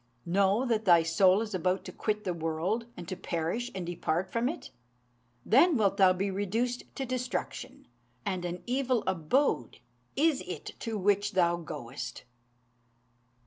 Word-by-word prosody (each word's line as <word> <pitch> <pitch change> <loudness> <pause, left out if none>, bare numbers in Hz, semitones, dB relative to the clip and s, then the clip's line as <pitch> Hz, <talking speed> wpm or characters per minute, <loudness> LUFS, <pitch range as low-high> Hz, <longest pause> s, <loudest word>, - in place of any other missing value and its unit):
Know 195 +7 +2
that 225 -3 0
thy 170 -3 +6
soul 185 +4 +4
is 215 -2 -7
about 185 +1 0
to - - -6
quit 210 -1 -2
the 185 -3 -1
world, 170 +8 -2
and 175 - -8
to 185 - -3
perish 175 +8 -2
and 185 -2 -3
depart 175 +1 -2
from 235 +2 +1
it: 335 - -7 0.7
then 285 - +5
wilt 200 -3 +2
thou 190 -2 +6
be 195 +2 -1
reduced 225 +6 -1
to 270 - -3
destruction, 255 +1 -4 0.4
and 185 -2 -2
an 175 0 -4
evil 255 -2 +1
abode 190 - +1 0.4
is 305 -1 +2
it - - -6
to 225 -2 -3
which 205 +1 +1
thou 175 -2 +3
goest!" 135 -6 -7
195 Hz, 150 wpm, -30 LUFS, 175-235 Hz, 0.7 s, thy